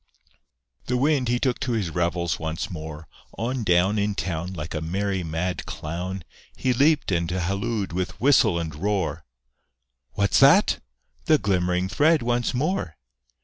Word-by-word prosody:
The 125 - +1
Wind, 140 -1 +2
he 120 +1 +2
took 125 -1 0
to 130 -2 -1
his 100 -7 -1
revels 85 0 -1
once 80 +2 -4
more; 80 -2 -7 0.3
On 125 +2 -2
down 95 +2 +3
In 100 0 0
town, 90 -2 -3
Like 80 -3 -6
a 75 - -3
merry 95 +3 -1
mad 85 +3 -3
clown, 90 +4 -5 0.3
He 130 -1 +1
leaped 145 0 +3
and 85 -2 0
hallooed 100 +3 -2
with 90 +1 -3
whistle 125 -8 +4
and 80 -2 -3
roar, 80 -3 -2 0.9
"What's 100 -1 +2
that?" 145 +9 +6 0.5
The 155 -2 +5
glimmering 90 -5 0
thread 150 +8 +3
once 120 0 0
more! 145 - -2
95 Hz, 145 wpm, -24 LUFS, 85-120 Hz, 0.9 s, that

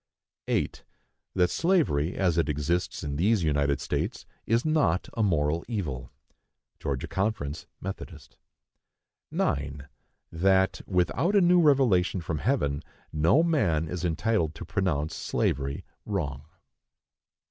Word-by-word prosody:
8. - - -1 0.5
That 90 -2 +3
slavery, 150 - +2
as 90 -4 +1
it 85 - +1
exists 75 +4 -1
in 70 -1 -3
these 100 +3 +2
United 70 -2 +1
States, - - -3 0.2
is 115 +4 +2
not 155 - +2
a 115 - -1
moral 80 -4 +1
evil. 85 - -3 0.7
(Georgia 70 -2 -3
Conference, 95 -7 -2
Methodist.) 85 -7 -8 0.9
9. 70 0 -2 0.4
That, 95 +3 +2
without 100 - +1
a 200 - +6
new 175 0 +5
revelation 125 - +3
from 80 -2 -3
heaven, 70 +1 0 0.3
no 80 - +4
man 100 - +1
is 90 +1 -4
entitled 85 -1 0
to 85 - -7
pronounce 80 -4 -1
slavery 70 0 -1 0.2
wrong. 75 -9 -3
85 Hz, 115 wpm, -27 LUFS, 75-105 Hz, 0.9 s, a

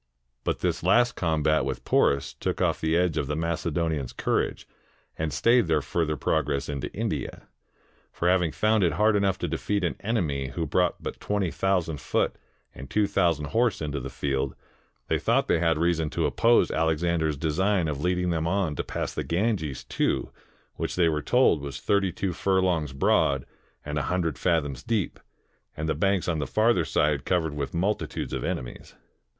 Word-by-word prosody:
But - - -2
this - - 0
last 120 0 +3
combat 80 -3 +1
with 65 -1 -4
Poms 70 -1 +2
took - - -3
off - - +1
the 80 +1 +2
edge 90 -3 +1
of 70 - -2
the 75 - -2
Macedonians' 80 -3 -1
courage, - - -1 0.5
and 80 -1 -2
stayed 115 - +3
their 80 -3 +2
further 75 -1 -1
progress 75 -1 0
into 70 -2 -4
India. - - -4 0.6
For 85 - -2
having 90 -3 +3
found 110 +2 +2
it 85 -3 +2
hard 105 +5 +3
enough 100 -2 +2
to - - -3
defeat 100 -2 -1
an 85 - 0
enemy 80 - -1
who 80 +5 -3
brought 90 +4 0
but - - -5
twenty 100 -4 -1
thousand 90 -6 0
foot - - 0 0.4
and 65 +2 -10
two 105 -1 +2
thousand 85 -7 +1
horse 115 +2 +1
into 75 -2 -3
the 70 +1 -6
field, 70 +1 -2 0.5
they - - +1
thought - - +2
they 85 - +2
had 80 -2 +2
reason 80 -1 +1
to - - -1
oppose 115 +1 +3
Alexander's 80 -1 +1
design 85 +4 +1
of 70 -2 -3
leading 90 0 +1
them 80 -1 -1
on 90 -4 0
to - - -1
pass - - -4
the - - -3
Ganges 85 - -1
too, - - -1 0.5
which - - -3
they 85 -2 +3
were 75 -1 -1
told 125 - +3
was 70 -2 -6
thirty 100 -2 +1
two 90 +1 -2
furlongs 90 -5 +1
broad 70 0 +2 0.4
and 75 0 -2
a - - -3
hundred 85 -5 -1
fathoms 75 -7 0
deep, 110 -6 -2 0.6
and 80 +1 -2
the 80 - +1
banks 95 +4 +1
on 85 -3 0
the 70 - -2
farther 110 -6 +2
side 75 -2 +1
covered 80 -4 0
with 75 +2 -4
multitudes 95 +5 -2
of - - -2
enemies. - - -5
80 Hz, 180 wpm, -26 LUFS, 75-95 Hz, 0.6 s, last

